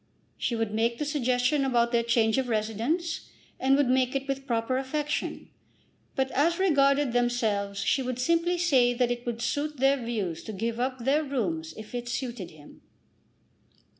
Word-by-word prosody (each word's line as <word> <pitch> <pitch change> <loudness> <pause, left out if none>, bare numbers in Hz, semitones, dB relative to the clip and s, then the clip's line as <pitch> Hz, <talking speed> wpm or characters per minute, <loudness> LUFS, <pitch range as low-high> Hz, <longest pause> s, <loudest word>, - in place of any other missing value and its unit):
She 235 - -2
would 225 -2 -2
make 230 +2 +1
the 300 - -2
suggestion 265 -1 +1
about 240 -3 +2
their 235 -1 +3
change 230 0 +2
of 255 -2 -2
residence, 235 - -1 0.3
and 270 +1 +4
would 285 -2 +3
make 255 +1 +2
it 275 0 -2
with 275 0 -3
proper 235 +1 0
affection; 295 +2 -3 0.7
but 265 -1 0
as 335 +5 +2
regarded 280 -7 +3
themselves 220 -5 0
she 265 - +2
would 255 -1 -3
simply 335 +6 +1
say 260 -9 +3
that 245 0 +1
it 245 0 -4
would 235 0 -3
suit 295 +3 -1
their 270 0 +2
views 205 -8 -3
to 220 - -6
give 230 +4 -3
up 255 -1 -2
their 290 +3 +3
rooms 185 - -2
if 215 +1 -10
it 240 0 -4
suited 240 -8 -4
him. 150 -2 -16
245 Hz, 170 wpm, -27 LUFS, 230-275 Hz, 0.7 s, and